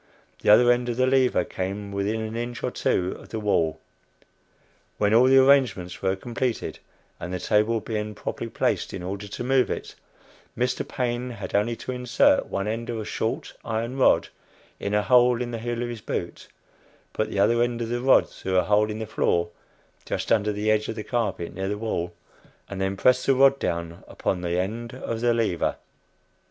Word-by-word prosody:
The - - +1
other 120 +3 +7
end 120 0 +1
of 120 - -2
the 130 - +3
lever 130 -1 +3
came 100 +2 -4
within 100 +3 -1
an 110 0 -5
inch 120 0 -4
or - - -1
two 90 +1 0
of - - -14
the 110 - -4
wall. 85 -7 +1 1.2
When 105 0 +2
all 120 +3 +6
the 135 +1 +6
arrangements 130 -10 +3
were 95 0 +1
completed, 120 +3 -3 0.4
and 90 - -6
the 90 - -3
table 105 +4 +2
being 105 -1 -4
properly 115 - -5
placed - - -1
in 90 - -6
order 100 +3 -5
to 100 - -6
move 130 0 +2
it, - - -4 0.6
Mr. 125 +1 -1
Paine 125 0 -2
had 105 -6 -7
only 105 +4 +1
to 130 - -6
insert 130 - +2
one 100 +1 -3
end 115 +2 -3
of 115 - -2
a 110 - -5
short 110 +1 -3
iron 115 +2 -3
rod 135 - +3 0.5
in 100 +1 -2
a 105 - +2
hole 125 0 +5
in 120 -1 -3
the 115 - -4
heel 120 +1 -3
of 120 - -3
his 120 -2 -6
boot, - - -5 0.7
put 110 - -1
the - - -5
other 115 +4 +3
end 120 -1 0
of 115 -1 -3
the 120 +1 -2
rod 130 +1 +5
through 95 0 -3
a 90 - +4
hole 105 +1 +2
in 105 - -4
the 110 - -4
floor, 85 -5 0 0.5
just - - -3
under 105 -1 +3
the 105 +1 0
edge 110 0 +1
of - - -3
the 110 - -5
carpet 115 -8 -2
near 95 +2 -3
the 105 +1 -2
wall, 95 -6 -2 0.6
and 95 -1 -6
then 95 0 -1
press 125 +4 +3
the 135 - +5
rod 135 +1 +5
down 85 0 -3
upon 90 - -2
the 85 0 -1
end 115 +6 -4
of 115 -3 -4
the 120 0 +3
lever. 115 -7 0
110 Hz, 200 wpm, -25 LUFS, 100-120 Hz, 1.2 s, other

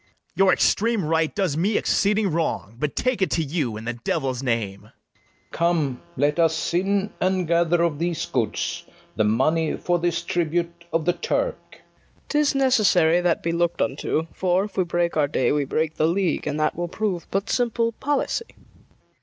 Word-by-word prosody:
BARABAS. - - -38
Your 195 -1 +5
extreme 225 -4 +2
right 160 0 0
does 190 -8 0
me 195 +7 +1
exceeding 205 -1 +1
wrong: 155 -9 -2
But 150 0 -2
take 255 -4 0
it 190 - +2
to 165 - 0
you, 140 -7 -2
i'the 120 +2 -5
devil's 130 -2 -1
name! 115 -6 -1
FERNEZE. - - -29 0.6
Come, 165 -7 0 0.2
let 145 +3 +1
us 160 0 +1
in, 195 +3 0
and 185 -1 +1
gather 170 0 +2
of 160 -4 0
these 170 -1 -1
goods 115 -5 -2 0.3
The 110 - +2
money 155 +9 +1
for 175 0 0
this 170 -1 -1
tribute 170 0 -2
of 165 -1 0
the 175 - +3
Turk. - - -1
FIRST - - -16
KNIGHT. - - -30
'Tis 295 -2 +2
necessary 200 -11 +4
that 175 -2 +1
be 165 - 0
look'd 170 0 0
unto; 155 +3 -1
For, 185 0 +1
if 210 - -8
we 185 - +1
break 175 0 0
our 150 -2 +2
day, 130 -4 +1
we 145 -1 +1
break 155 +3 -1
the 155 - +3
league, 175 -2 0
And 150 0 -2
that 155 - +1
will 175 +1 -3
prove 185 -1 -3
but 195 +2 -1
simple 235 -1 +1
policy. 290 - -2
170 Hz, 185 wpm, -23 LUFS, 155-190 Hz, 0.6 s, Your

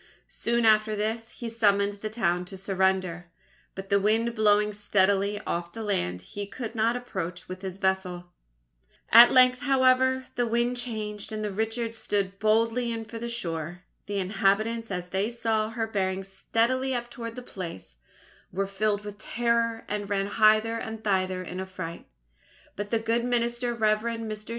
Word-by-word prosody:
Soon 235 0 0
after 215 0 +4
this, 220 +2 -2
he 240 - -7
summoned 205 -3 +2
the 215 - -3
town 180 -6 0
to 190 +1 -9
surrender, 190 -2 0 0.5
but 195 0 -7
the 200 -1 +4
wind 225 +3 +2
blowing 210 -1 +3
steadily 200 0 +1
off 170 -2 -3
the 225 - -5
land, 90 - -1
he 200 - -6
could 225 +2 -6
not 230 +1 +1
approach 180 -8 -5
with 185 0 -7
his 190 -1 -5
vessel. 185 -2 -1 0.8
At 235 +2 +10
length, 255 0 +6
however, 260 -1 +3
the 245 0 0
wind 240 +2 +1
changed 215 -4 -4
and 215 0 -3
the 210 - -2
Richard 225 +3 -2
stood 200 -3 -2
boldly 230 +2 +2
in 225 -1 -4
for 225 +1 -8
the 235 +1 -4
shore. 175 -5 -4 0.2
The 205 0 -2
inhabitants, 205 +4 +1
as 180 -2 -4
they 195 +4 0
saw 225 -2 0
her 225 0 -2
bearing 195 -3 -1
steadily 235 +7 0
up 240 0 -4
towards 230 -2 -6
the 250 - -7
place, 165 - -8 0.5
were 195 +2 -1
filled 205 +1 -1
with 205 -1 -8
terror, 230 0 0
and 205 -1 -3
ran 195 -1 +1
hither 215 +2 +3
and 220 0 -6
thither 185 -3 0
in 180 +1 -6
affright; 185 -3 -6 0.7
but 205 0 -4
the 230 - +2
good 230 +1 0
minister, 240 0 0
Rev. 215 -2 +2
Mr. 225 -2 -5
215 Hz, 165 wpm, -27 LUFS, 195-230 Hz, 0.8 s, At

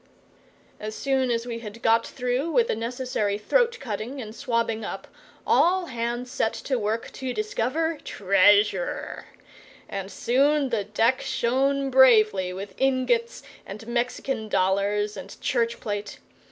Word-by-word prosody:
As 215 0 -5
soon 265 -2 0
as 230 0 0
we 235 -1 -5
had 230 +1 -10
got 230 +1 +3
through 250 +5 -2
with 470 +6 +2
the - - +1
necessary 230 -3 -2
throat 475 - +2
cutting 240 +2 -5
and 220 -3 -7
swabbing 230 -2 -1
up - - -6 0.4
all 365 +1 +3
hands 240 -2 -3
set 225 -5 0
to 260 -3 -2
work 220 +2 -2
to 260 -2 -5
discover 325 - -1
treasure; 200 -1 +2 0.6
and 195 0 -5
soon 280 +3 +2
the 220 -5 -1
deck 225 +5 +1
shone 270 +3 0
bravely 215 -8 +5
with 190 +2 -7
ingots 255 -3 +1 0.2
and 210 +3 -9
Mexican 240 -1 -2
dollars 200 +2 +1
and - - -9
church 235 -2 0
plate. 205 -1 -4
235 Hz, 135 wpm, -25 LUFS, 210-265 Hz, 0.6 s, bravely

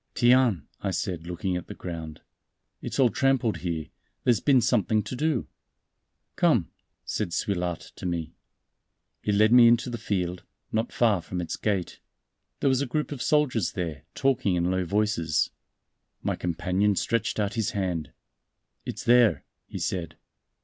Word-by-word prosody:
"Tiens!" 120 - +4 0.2
I 100 - -1
said, 90 -2 -3
looking 90 +1 -2
at 90 - -4
the - - -8
ground, 80 -3 -7 0.6
"it's - - -5
all 130 -3 +5
trampled 130 -6 +2
here; 85 -2 -4 0.3
there's 120 -5 +3
been 140 -3 +4
something 110 -2 +2
to 110 - -5
do." 150 -2 0 0.9
"Come," - - +2 0.3
said 105 -4 -2
Suilhard 90 -2 -1 0.2
to - - -4
me. 85 -2 -3 0.9
He 105 - 0
led 110 +3 +4
me 120 -1 +9
into 120 +1 +3
the 120 - -4
field, 90 -3 -2 0.3
not 110 +2 -1
far 110 -6 +2
from 90 +2 -5
its 85 - -3
gate. 100 -5 -2 0.6
There - - +2
was 130 0 +3
a 140 - -1
group 150 +5 -2
of 140 -4 -5
soldiers 140 - +2
there, 80 -7 -4
talking 120 -8 +1
in 90 +1 +1
low 95 -1 0
voices. 100 -5 +1 0.7
My - - 0
companion 90 +4 0
stretched 115 +2 0
out 100 -1 0
his 110 -2 0
hand. 85 -7 -2 0.8
"It's - - -5
there," 120 -9 +5 0.2
he - - -7
said. 85 -3 -3
100 Hz, 155 wpm, -27 LUFS, 90-120 Hz, 0.9 s, me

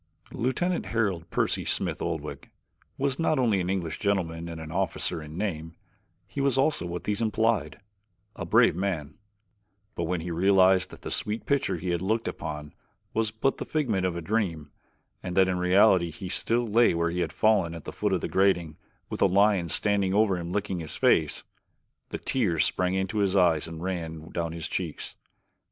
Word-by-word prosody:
Lieutenant 165 - -1
Harold 95 -6 -1
Percy - - 0
Smith - - 0
Oldwick - - -4 0.5
was 140 -1 -1
not 160 -2 +2
only 110 -7 +2
an 90 - -2
English 90 -4 -2
gentleman 85 -5 -1
and 85 -1 -6
an 80 -1 -8
officer 80 - 0
in 75 +1 -9
name, 85 -5 -3 0.5
he 140 - -5
was 135 -2 +2
also 135 - +1
what 85 0 -5
these 105 +1 -1
implied 110 -7 0 0.6
a - - -5
brave - - +4
man; 85 -6 -3 0.7
but 85 - -2
when 90 0 -1
he 85 +1 -5
realized 95 +1 +4
that - - -13
the - - -5
sweet 105 +2 -2
picture 140 -10 +1
he 90 +2 -3
had 85 -1 -1
looked 110 +4 0
upon 75 -1 -5 0.4
was 110 -1 +1
but 110 +5 -1
the - - -4
figment 120 -12 -1
of 90 -2 0
a 85 - -4
dream, 85 -6 -2 0.5
and 90 0 -5
that 95 -1 +6
in 90 -1 -1
reality 90 -1 +4
he 90 +4 -7
still 120 +5 0
lay 115 -3 +4
where 85 0 0
he 90 - -3
had 85 -3 -1
fallen 95 -2 +2
at 80 - -8
the - - -7
foot - - -1
of - - +1
the - - -2
grating 90 -5 +1 0.3
with - - -6
a - - +6
lion 100 -2 +3
standing 100 +1 +1
over 105 -2 +3
him 85 -1 -5
licking 95 -2 -2
his 80 -2 -6
face, - - +2 0.7
the - - -4
tears 90 - +1
sprang 95 +1 0
to 105 +3 -3
his 100 -1 +1
eyes 85 -5 +3
and 80 0 -7
ran 80 -4 -4
down 85 -1 -2
his 80 -1 -5
cheeks. 85 -5 -4
95 Hz, 190 wpm, -27 LUFS, 85-105 Hz, 0.7 s, that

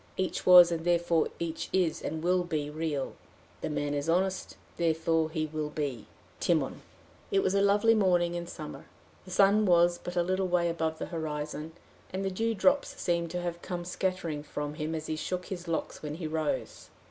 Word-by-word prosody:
Each 185 0 -2
was, 180 -1 +10
and 165 -1 -2
therefore 170 -1 +2
each 165 -1 -4
is 170 -4 +1
and 160 0 -4
will 180 +1 +3
be, 150 -4 -2
real. 155 -3 -2 0.2
".... - - -29
The - - -2
man 145 -1 -1
is 145 +2 -2
honest." 185 +2 0 0.2
"Therefore 165 -1 +1
he 155 -1 -1
will 155 -1 -3
be, 145 -7 -4 0.3
Timon." - - 0 0.5
It 195 0 +2
was 190 - +1
a 200 - +3
lovely 205 +3 +4
morning 180 -5 +3
in 175 0 -4
summer. 155 -2 -8 0.4
The - - -12
sun 200 +3 +4
was 175 0 +4
but 175 - -6
a 175 - +3
little 185 +1 0
way 175 -1 +2
above 160 -1 -1
the - - -4
horizon, 150 0 -4 0.4
and 190 +1 -3
the 195 - 0
dew 225 +4 0
drops 280 +8 +2
seemed 170 -1 0
to 180 +1 -3
have 170 -1 -4
come 175 -2 -4
scattering 180 -4 -2
from 145 0 -5
him 155 +1 -3
as 155 -1 -4
he 155 - -2
shook 180 +3 -3
his 180 -2 -6
locks 165 -1 -3
when 150 -1 -5
he 165 0 -6
rose. 155 -1 -3
170 Hz, 195 wpm, -29 LUFS, 155-185 Hz, 0.5 s, was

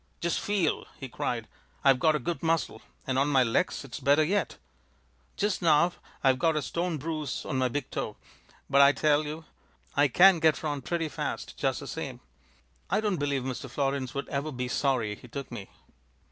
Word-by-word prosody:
"Just 170 0 0
feel!" 200 -6 0
he 135 - -5
cried. 115 -2 -3 0.4
"I've 135 -2 +5
got 155 +1 +4
a - - 0
good 165 +6 -3
muscle, 165 -9 0 0.2
and 130 0 0
on 140 - +3
my 135 -3 +4
legs 115 +3 0
it's 125 - -7
better 145 +2 +4
yet. 200 +6 0 0.8
Just 205 -1 0
now 170 +1 +4 0.3
I've 130 -2 +4
got 160 +3 +2
a 150 - 0
stone 170 +3 -2
bruise 155 -2 -4
on 130 - -1
my 130 - +3
big 140 +2 -4
toe, - - -4 0.5
but 140 +1 +5
I 140 +1 +7
tell 150 0 +2
you 155 +2 -6 0.5
I 145 +1 +5
can 180 +6 +6
get 160 -1 +3
round 145 -4 -3
pretty 170 -2 -1
fast 150 - -4
just - - -1
the - - -8
same. - - -5 0.7
I 200 - +2
don't 210 -4 0
believe 140 -3 -1
Mr. 130 -1 -5
Florins 135 -1 -2
would 140 - -3
ever 145 +2 -2
be 125 -2 -3
sorry 125 -5 0
he 115 - -12
took 135 +3 -7
me." 100 - -7
145 Hz, 190 wpm, -28 LUFS, 130-160 Hz, 0.8 s, I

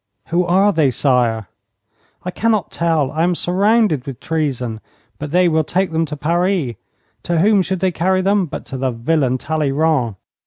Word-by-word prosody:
'Who 175 +2 +2
are 195 +4 +3
they, 155 -5 +3
sire?' 120 -4 +1 0.8
'I 180 - -4
cannot 215 -2 0
tell. 160 -5 0
I 155 +1 -2
am 175 +1 +2
surrounded 195 - +1
with 135 -3 -6
treason. 130 -8 -2 0.4
But 150 - -5
they 180 +3 +3
will 160 -1 +2
take 185 +3 -1
them 160 0 0
to 150 0 -6
Paris. 170 -3 0 0.5
To 170 -1 -1
whom 200 +2 +4
should 190 0 -3
they 190 -1 +2
carry 185 +3 0
them 195 -1 +2
but 155 - -7
to 135 - -6
the 130 0 0
villain 130 +2 0
Talleyrand? 150 -5 0
160 Hz, 170 wpm, -18 LUFS, 140-185 Hz, 0.8 s, whom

